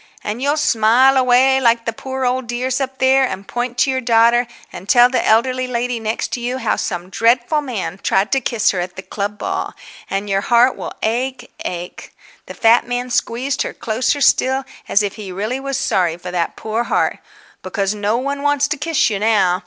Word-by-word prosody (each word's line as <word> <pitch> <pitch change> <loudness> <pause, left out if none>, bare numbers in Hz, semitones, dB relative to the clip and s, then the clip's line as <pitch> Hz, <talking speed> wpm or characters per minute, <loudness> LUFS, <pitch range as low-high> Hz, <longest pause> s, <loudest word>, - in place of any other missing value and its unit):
"And 215 +4 -4
you'll 285 +2 +1
smile 260 -2 +4
away 260 +1 +4
like 230 -1 +2
the 230 - -2
poor 265 +3 -4
old 250 0 -1
dears 250 +3 -2
up 265 0 -3
there, 265 +1 +4
and 200 -6 -3
point 245 0 -3
to 265 +1 +3
your 260 0 -1
daughter, 235 0 +3 0.3
and 190 - -10
tell 245 0 +6
the 255 - +1
elderly 255 +3 +2
lady 245 -1 -2
next 220 0 -3
to - - -3
you 245 +2 -2
how - - 0
some 180 -1 -4
dreadful 245 +8 +2
man 210 - -5
tried 195 +2 +1
to 270 - +2
kiss 235 -5 +1
her 185 - -3
at 180 0 -4
the 190 - -8
club 205 +1 -4
ball. - - -3 0.3
And 195 +1 -2
your 195 -1 0
heart 240 +4 +3
will - - -7
ache, 255 +4 -2
ache"—the 175 0 -9
fat 230 +1 +4
man 245 0 -3
squeezed 255 +4 -1
her - - -3
closer 250 +5 -1
still, 265 0 +3 0.3
as 205 - +3
if 205 +1 -4
he 200 -3 -7
really 215 +8 -3
was 275 0 -3
sorry 175 -3 0
for 180 +1 -8
that 175 -2 -2
poor 220 +2 -3
heart—"because 195 -2 -3
no 210 +2 -1
one 280 +2 -3
wants 290 0 +2
to 300 - -1
kiss 295 -4 +1
you 200 - -2
now. 205 -4 +2
240 Hz, 200 wpm, -18 LUFS, 210-260 Hz, 0.3 s, tell